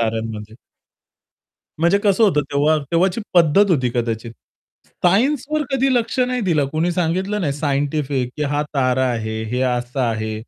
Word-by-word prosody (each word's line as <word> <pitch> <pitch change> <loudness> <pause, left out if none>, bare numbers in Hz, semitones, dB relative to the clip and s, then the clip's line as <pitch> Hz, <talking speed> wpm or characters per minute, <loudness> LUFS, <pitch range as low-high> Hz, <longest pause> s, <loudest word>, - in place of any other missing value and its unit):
ताऱ्यांमध्ये. 110 -1 -3 1.3
म्हणजे 170 +4 +3
कसं 200 +2 +3
होतं 175 -8 +3
तेव्हा, 150 +2 +3
तेव्हाची 180 +5 +1
पद्धत 175 +4 +4
होती 130 -7 +2
कदाचित. 115 -1 -2 0.7
सायन्सवर 275 +10 +2
कधी 270 0 +1
लक्ष 235 +1 -1
नाही 250 0 0
दिलं. 165 -9 +1
कुणी 160 +3 0
सांगितलं 185 +4 -1
नाही 150 -7 0
सायंटिफिक, 140 -2 -1
की 150 - -2
हा 145 0 0
तारा 130 -1 +1
आहे, 110 -1 -3
हे 125 +1 -1
असं 125 +1 -1
आहे. 110 -3 -1
150 Hz, 145 wpm, -20 LUFS, 125-190 Hz, 1.3 s, पद्धत